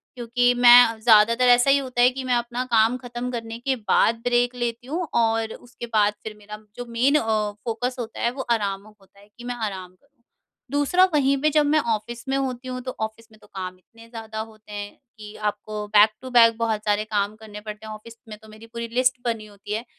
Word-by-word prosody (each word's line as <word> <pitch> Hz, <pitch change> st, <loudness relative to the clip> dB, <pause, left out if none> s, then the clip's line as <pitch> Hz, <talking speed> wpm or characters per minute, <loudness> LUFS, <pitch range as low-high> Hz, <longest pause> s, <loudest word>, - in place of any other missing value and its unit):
क्योंकि 245 Hz, 0 st, +1 dB
मैं 245 Hz, -2 st, +7 dB
ज़्यादातर 230 Hz, +2 st, +5 dB
ऐसा 245 Hz, +2 st, +5 dB
ही 275 Hz, -, +6 dB
होता 255 Hz, -3 st, -2 dB
है 245 Hz, -, +7 dB
कि 260 Hz, +1 st, -6 dB
मैं 250 Hz, -1 st, +1 dB
अपना 240 Hz, +1 st, -2 dB
काम 225 Hz, +2 st, +3 dB
ख़त्म 245 Hz, 0 st, -6 dB
करने 230 Hz, -1 st, -5 dB
के 265 Hz, +2 st, -1 dB
बाद 225 Hz, 0 st, +2 dB
ब्रेक 245 Hz, 0 st, +1 dB
लेती 240 Hz, 0 st, -4 dB
हूँ 335 Hz, +4 st, -3 dB
और 225 Hz, -1 st, 0 dB
उसके 245 Hz, -1 st, -10 dB
बाद 210 Hz, -1 st, +3 dB
फिर 215 Hz, -1 st, -7 dB
मेरा 210 Hz, 0 st, -10 dB, 0.2 s
जो 245 Hz, -, -6 dB
मेन 250 Hz, +5 st, +2 dB
अ, 220 Hz, -6 st, +1 dB
फोकस 245 Hz, +2 st, -2 dB
होता 230 Hz, -1 st, -6 dB
है 235 Hz, -, +1 dB
वो 265 Hz, -, -6 dB
आराम 200 Hz, -4 st, -1 dB
होता 200 Hz, -2 st, -22 dB
है 200 Hz, -, -19 dB
कि 240 Hz, -, -11 dB
मैं 245 Hz, 0 st, -4 dB
आराम 195 Hz, -5 st, -5 dB
करूँ। -, -, -36 dB, 0.5 s
दूसरा, 290 Hz, +6 st, +3 dB
वहीं 275 Hz, -2 st, +2 dB
पे 305 Hz, -, +3 dB
जब 300 Hz, 0 st, +3 dB
मैं 305 Hz, +2 st, +3 dB
ऑफिस 235 Hz, +1 st, -3 dB
में 270 Hz, -, +1 dB
होती 255 Hz, -1 st, -3 dB
हूँ 255 Hz, 0 st, -5 dB
तो 255 Hz, 0 st, -6 dB
ऑफिस 220 Hz, +1 st, -6 dB
में 215 Hz, -, -18 dB
तो -, -, -19 dB
काम 185 Hz, -1 st, -7 dB
इतने 230 Hz, +5 st, -19 dB
ज़्यादा 220 Hz, -2 st, -7 dB
होते 220 Hz, -1 st, -10 dB
हैं 205 Hz, 0 st, -6 dB, 0.3 s
कि 210 Hz, 0 st, -11 dB
आपको 210 Hz, 0 st, -7 dB
बैक 210 Hz, +1 st, +8 dB
टू 260 Hz, -, -8 dB
बैक 230 Hz, -2 st, +6 dB
बहुत 225 Hz, -2 st, -1 dB
सारे 210 Hz, 0 st, +1 dB
काम 210 Hz, -1 st, -1 dB
करने 210 Hz, -1 st, -11 dB
पड़ते 215 Hz, 0 st, -9 dB
हैं। 215 Hz, -, -6 dB
ऑफिस 215 Hz, +2 st, -11 dB, 0.2 s
में 210 Hz, -, -8 dB
तो -, -, -14 dB
मेरी 215 Hz, +1 st, -13 dB
पूरी 235 Hz, 0 st, -4 dB
लिस्ट 255 Hz, +1 st, +2 dB
बनी 225 Hz, -2 st, -2 dB
होती 205 Hz, 0 st, -9 dB
है। 225 Hz, +3 st, -3 dB
230 Hz, 225 wpm, -23 LUFS, 215-245 Hz, 0.5 s, बैक